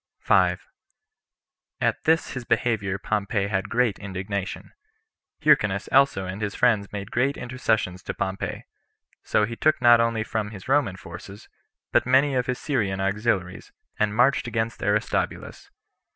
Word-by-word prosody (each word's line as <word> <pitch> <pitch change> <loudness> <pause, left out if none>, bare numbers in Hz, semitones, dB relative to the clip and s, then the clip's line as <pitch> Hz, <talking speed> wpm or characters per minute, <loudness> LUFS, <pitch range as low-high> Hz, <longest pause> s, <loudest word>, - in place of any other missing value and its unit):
5. - - +2 1.1
At - - -1
this 160 +1 +2
his 125 - -5
behavior 110 -4 0
Pompey 105 0 -1
had 100 -1 -2
great 120 -4 +1
indignation; 95 0 -5 0.7
Hyrcanus 100 0 +3
also 135 -9 +3
and 95 +3 -6
his 105 -1 -3
friends 110 -5 +2
made 100 +1 -6
great 135 +4 +1
intercessions 110 -7 -1
to - - -6
Pompey; 95 0 -4 0.6
so 105 - +1
he 115 +2 -6
took 155 +6 +2
not 120 -2 +6
only 115 -2 0 0.2
his 105 -4 -11
Roman 130 -8 +2
forces, 100 +2 -11 0.4
but - - +2
many 135 +2 +4
of 125 -1 0
his 125 -1 -1
Syrian 105 -10 -1
auxiliaries, 100 -2 -1 0.3
and 105 0 +1
marched 125 +1 +3
against 115 0 -2
Aristobulus. 105 +2 -2
110 Hz, 135 wpm, -24 LUFS, 100-125 Hz, 1.1 s, not